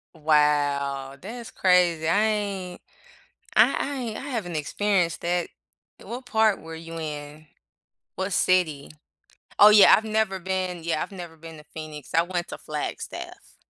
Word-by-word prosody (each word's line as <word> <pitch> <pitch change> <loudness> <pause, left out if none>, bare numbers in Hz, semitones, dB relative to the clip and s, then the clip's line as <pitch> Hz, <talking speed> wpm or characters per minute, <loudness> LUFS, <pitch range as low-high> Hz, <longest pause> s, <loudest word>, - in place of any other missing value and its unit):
Wow. 145 -3 +1
That's 230 +4 -8
crazy. 175 -4 +3
I 200 +6 +3
ain't 200 -4 -2 0.7
I - - +5
I 285 - -2
ain't 225 -3 -4
I - - -6
haven't 220 - -4
experienced 180 +2 0
that. 175 0 -1 0.5
What 245 +4 -8
part 220 -3 +2
were 160 0 -9
you 165 0 -8
in? 150 0 -7 0.7
What 190 +1 -3
city? 165 -6 +1 0.7
Oh, 210 - +9
yeah, 210 -1 +8
I've 215 - -3
never 215 -3 0
been 185 -1 -3
yeah, 165 -2 0
I've - - -7
never 175 -3 -9
been 165 0 -11
to 150 - -14
Phoenix. 155 -3 -9
I 165 - +5
went 175 0 -4
to - - -6
Flagstaff. 150 -1 -7
175 Hz, 150 wpm, -25 LUFS, 155-205 Hz, 0.7 s, Oh